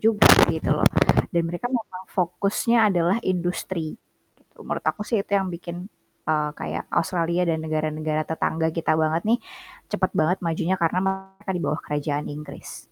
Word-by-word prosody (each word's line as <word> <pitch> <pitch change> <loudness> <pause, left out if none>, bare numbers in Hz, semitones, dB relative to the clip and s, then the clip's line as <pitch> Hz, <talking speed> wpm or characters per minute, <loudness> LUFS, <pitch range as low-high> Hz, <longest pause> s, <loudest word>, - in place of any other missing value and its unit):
juga 220 -1 +5 0.2
gitu - - -3
loh. - - +2 0.5
Dan 170 -1 +1
mereka 175 +8 -3
memang 220 -7 -4
fokusnya 200 +5 +2
adalah 175 +1 +2
industri, 175 -1 -2 0.4
gitu - - -18
menurut - - -4
aku 210 - -1
sih 220 -1 0
itu 200 - -8
yang 195 -1 0
bikin, 170 0 -6 0.5
eee, 150 -1 +1
kayak - - -4
Australia 170 +1 +1
dan 160 -1 +1
negara-negara 155 0 -1
tetangga 160 0 -1
kita 165 -1 0
banget 160 +1 +1
nih, 235 +2 +4 0.5
cepat 190 -3 +1
banget 170 +4 +2
majunya 170 +2 0
karena 170 +1 +2
mereka 190 +1 -4
di 180 - -2
bawah 155 - -1
kerajaan 145 0 -2
Inggris. 150 +1 -9
170 Hz, 160 wpm, -24 LUFS, 160-190 Hz, 0.5 s, juga